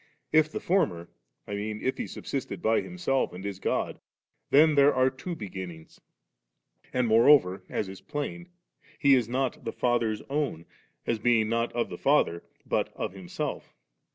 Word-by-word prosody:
If 155 0 +5
the - - -3
former, 90 - 0 0.3
I - - -6
mean 105 +1 -3
if 130 - -1
He - - -2
subsisted 125 -8 -5
by 110 +4 +2
Him 180 - -9
self 135 -7 0
and 95 +2 -8
is 100 -2 -4
God, - - -1 0.5
then 155 +2 +6
there 140 0 +6
are 130 0 +3
two 135 +7 -6
Beginnings; 95 - -8 0.9
and 125 -1 +1
moreover, 110 -5 +5
as 105 - -2
is 95 0 -9
plain. 165 +4 -5 0.5
He 140 -2 +5
is 120 -4 +3
not 130 0 -1
the 115 - -3
Father's 115 -3 0
own, 140 - -2 0.4
as 115 - 0
being 110 -1 +3
not 115 +1 0
of 120 - -1
the - - -7
Father, 135 - +2 0.2
but - - 0
of - - -4
Himself. 95 -3 -5
120 Hz, 165 wpm, -28 LUFS, 100-140 Hz, 0.9 s, then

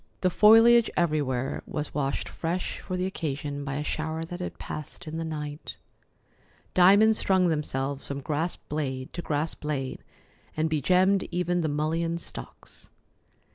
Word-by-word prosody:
The 185 - +2
foliage 225 +4 +7
everywhere 145 -6 0
was 150 0 -3
washed 140 -2 -1
fresh 175 +2 -3
for 185 - -4
the 180 - 0
occasion 145 -5 -3
by 135 -1 -3
a 150 - -2
shower 160 +2 -3
that 175 +2 -7
had 180 - -5
passed 155 +3 -7
in 160 0 -5
the 165 - -2
night. 150 -2 -5 1.0
Diamonds 205 +4 +6
strung 185 -2 +3
themselves 140 -3 -2
from 140 0 -4
grass 155 +5 -1
blade 135 -3 -4
to 175 - -4
grass 155 0 -1
blade, 140 -3 -4 0.5
and 160 0 +1
begemmed 185 +6 +3
even 175 0 0
the 160 - 0
mullein 165 +3 0
stalks. 170 - -10
160 Hz, 145 wpm, -27 LUFS, 145-180 Hz, 1.0 s, foliage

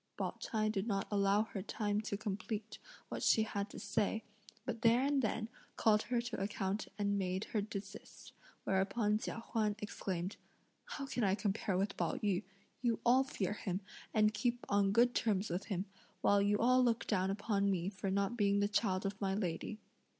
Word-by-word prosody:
Pao - - -1
ch'ai 215 -2 0
did 215 0 -1
not 195 -3 0
allow 200 +1 +3
her 220 -3 -5
time 205 +1 -1
to 205 -2 -3
complete 215 +1 -4 0.3
what - - -4
she 220 - +5
had 205 -1 -3
to - - -10
say, 210 +2 0 0.4
but 235 -3 -3
there 235 +2 +5
and 280 0 +2
then 220 -1 -1 0.3
called 210 -1 +4
her 240 +1 0
to 240 -3 -3
account 195 0 -2
and 200 -1 +1
made 185 +1 -1
her 215 - +2
desist; 200 -1 -8 0.3
whereupon 205 +3 +1
Chia - - -4
Huan 215 -2 +1
exclaimed: 190 -3 -4 0.5
"How 275 - -5
can 255 -3 -2
I 195 -1 +3
compare 200 -2 0
with 195 +2 -1
Pao 170 - 0
yü; 195 -4 0 0.4
you 235 -3 +1
all 255 +3 +6
fear 210 -8 -2
him, 190 -2 -3 0.3
and 215 0 +4
keep 240 +3 -1
on 200 -1 +3
good 240 +3 +4
terms 205 -4 +1
with 180 +3 -2
him, 190 -2 -2 0.4
while 200 0 +4
you 205 +1 +3
all 255 +3 +5
look 235 -2 +2
down 190 -3 +1
upon 200 0 +1
me 180 -2 0
for 195 0 -3
not 200 +3 +1
being 200 -3 +3
the 205 - +3
child 200 -2 +1
of 195 +1 -3
my 195 -1 +1
lady." 185 +1 -2
205 Hz, 185 wpm, -35 LUFS, 195-220 Hz, 0.5 s, all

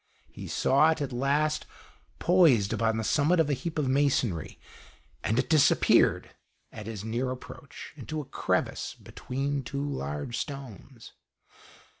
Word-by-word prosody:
He - - -9
saw 145 +4 +3
it, 160 - 0
at 140 -3 -3
last, 145 +4 0 0.5
poised 155 - +4
upon 115 -1 +1
the 110 - -2
summit 155 +9 +2
of 150 -2 +2
a - - +2
heap 160 +5 -4
of 150 -3 0
masonry, 130 - 0 0.6
and 110 - 0
it 130 - +1
disappeared, 150 -3 +4 0.4
at 110 -1 -9
his 110 -3 -6
near 120 +4 -2
approach, 135 +4 -9
into 155 +2 -5
a 150 - -5
crevice - - -2
between 140 +2 -4
two 140 +3 -4
large 75 - -4
stones. 135 -3 -8
135 Hz, 140 wpm, -28 LUFS, 115-150 Hz, 0.6 s, poised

